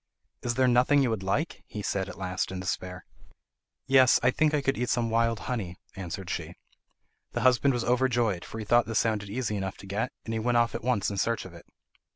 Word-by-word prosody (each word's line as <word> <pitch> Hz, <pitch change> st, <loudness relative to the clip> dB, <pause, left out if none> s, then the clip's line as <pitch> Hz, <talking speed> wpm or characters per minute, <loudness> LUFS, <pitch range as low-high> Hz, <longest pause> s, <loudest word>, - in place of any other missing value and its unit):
"Is 120 Hz, -1 st, -2 dB
there 130 Hz, 0 st, +3 dB
nothing 125 Hz, +4 st, +4 dB
you 125 Hz, -, +1 dB
would 110 Hz, -3 st, -2 dB
like?" 100 Hz, -, -1 dB
he 105 Hz, -, -6 dB
said 95 Hz, -1 st, -1 dB
at -, -, -9 dB
last 95 Hz, 0 st, -2 dB
in 95 Hz, -, -4 dB
despair. 90 Hz, 0 st, -4 dB, 0.8 s
"Yes, 130 Hz, -2 st, +6 dB
I 130 Hz, -, +5 dB
think 155 Hz, +3 st, +2 dB
I 150 Hz, -2 st, +1 dB
could 135 Hz, -, +1 dB
eat 125 Hz, +1 st, -2 dB
some 115 Hz, -2 st, 0 dB
wild 115 Hz, 0 st, +1 dB
honey," 105 Hz, -9 st, -3 dB, 0.2 s
answered 95 Hz, -1 st, -6 dB
she. -, -, -4 dB, 0.8 s
The -, -, -1 dB
husband 130 Hz, +1 st, +4 dB
was 120 Hz, -, -1 dB
overjoyed, 120 Hz, -6 st, +1 dB
for -, -, -8 dB
he 110 Hz, -, -5 dB
thought 120 Hz, +2 st, +4 dB
this 115 Hz, -1 st, -1 dB
sounded 105 Hz, -3 st, 0 dB
easy 105 Hz, -1 st, -2 dB
enough 95 Hz, -1 st, -4 dB
to -, -, -12 dB
get, 105 Hz, +7 st, -2 dB
and 115 Hz, -, -3 dB
he 110 Hz, -, -1 dB
went 120 Hz, +2 st, +1 dB
off 120 Hz, 0 st, +2 dB
at -, -, -5 dB
once 115 Hz, -5 st, +1 dB
in 100 Hz, -, -4 dB
search 115 Hz, +2 st, 0 dB
of 95 Hz, -, -10 dB
it. 85 Hz, -, -14 dB
115 Hz, 225 wpm, -28 LUFS, 100-125 Hz, 0.8 s, Yes